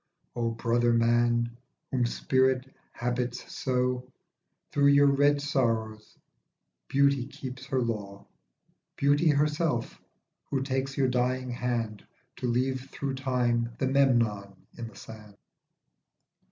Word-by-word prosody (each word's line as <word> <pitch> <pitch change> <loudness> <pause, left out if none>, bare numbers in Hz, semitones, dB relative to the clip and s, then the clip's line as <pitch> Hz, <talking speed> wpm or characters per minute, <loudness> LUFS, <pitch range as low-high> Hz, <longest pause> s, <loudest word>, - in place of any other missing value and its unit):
O 115 -1 0
brother 120 +1 +1
man, 120 0 +2 0.4
whom 125 -2 +1
spirit 130 +1 +1 0.3
habits 125 0 -3
so, 125 0 -1 0.6
Through 140 0 +4
j: 140 - +6
your 145 0 +6
.red 145 +1 +3
sorrows 115 -6 -1 0.7
Beauty 140 -2 +2
keeps 130 -1 -8
her 135 -1 0
law, 100 -4 -4 0.7
Beauty 145 +3 +3
herself, 150 -3 0 0.5
who 135 -1 0
takeslyour 135 0 0
dying 125 0 0
hand, 120 -3 -2 0.3
To 125 - -2
leave 130 +2 -1
through 140 -1 -4
Time 120 -3 0
the 135 - 0
Memnon 120 -7 +2 0.2
in 115 -1 -6
the 115 - -14
sand. 105 -2 -12
125 Hz, 115 wpm, -28 LUFS, 115-135 Hz, 0.7 s, j